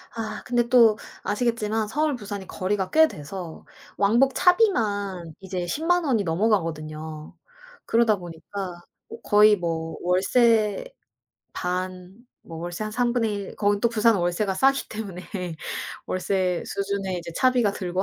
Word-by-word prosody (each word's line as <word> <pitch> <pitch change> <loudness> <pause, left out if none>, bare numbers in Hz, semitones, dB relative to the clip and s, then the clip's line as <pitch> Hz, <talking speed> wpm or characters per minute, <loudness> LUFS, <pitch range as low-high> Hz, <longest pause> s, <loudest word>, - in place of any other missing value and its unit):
아 220 -2 -5
근데 240 -1 +1
또 230 -4 +6 0.3
아시겠지만 220 -1 0
서울 295 +5 0
부산이 205 -4 -7
거리가 190 0 -2
꽤 320 0 +6
돼서 165 - -8 0.3
왕복 235 +7 +3
차비만 205 - +2
이제 185 -2 -4
100,000 335 - +1
원이 235 -7 +2
넘어가거든요. 160 -5 -2 0.5
그러다 225 -3 +3
보니까 175 +1 -7 0.4
거의 210 0 +6
뭐 165 -2 -3
월세 210 - +2 0.7
반 185 +1 -4 0.3
뭐 165 - -9
월세 175 +4 -5
한 215 - -3
1/3 225 -4 -1
거기 205 -1 +1
또 235 - +3
부산은 225 -2 +3
월세가 175 +3 0
싸기 270 +7 +2
때문에 200 -5 -6 0.8
월세 185 -1 -1
수준의 195 -2 -2
이제 170 0 -7
차비가 250 -5 +3
들고 185 -1 -2
200 Hz, 255 characters per minute, -25 LUFS, 180-230 Hz, 0.8 s, 또